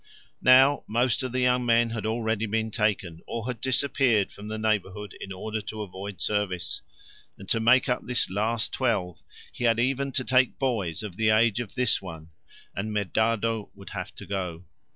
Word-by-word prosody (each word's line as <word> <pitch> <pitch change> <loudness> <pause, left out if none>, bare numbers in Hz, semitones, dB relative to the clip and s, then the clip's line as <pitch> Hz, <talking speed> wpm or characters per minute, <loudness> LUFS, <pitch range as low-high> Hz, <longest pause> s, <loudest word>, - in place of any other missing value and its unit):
Now 130 +3 +6
most 120 +2 +1
of 130 -2 -3
the 130 +1 0
young 125 0 +3
men 115 -1 +3
had 110 -1 -3
already 110 -1 -1
been 110 +1 -1
taken, 100 -7 -1
or 115 -1 -4
had 125 -2 -4
disappeared 130 -5 +2
from 105 - -10
the 110 0 -4
neighbourhood 105 -2 -2
in 100 - -7
order 110 +3 -4
to 110 +1 -6
avoid 95 -1 -8
service, 100 -3 -1 0.6
and 95 - -11
to 115 - +2
make 120 +3 +4
up 125 - 0
this 125 0 +1
last 110 +4 -1
twelve 100 - -1 0.3
he 120 - -3
had 115 -1 +3
even 135 +2 0
to 130 - 0
take 130 0 +3
boys 110 - -1
of 100 -4 -7
the 110 -1 +2
age 110 +1 +4
of 115 -5 -6
this 125 -3 +2
one, 85 -3 -9 0.4
and 105 +2 -3
Medardo 110 +1 0
would 100 -1 -12
have - - -5
to - - -9
go. 90 -3 -4
110 Hz, 185 wpm, -26 LUFS, 100-120 Hz, 0.6 s, Now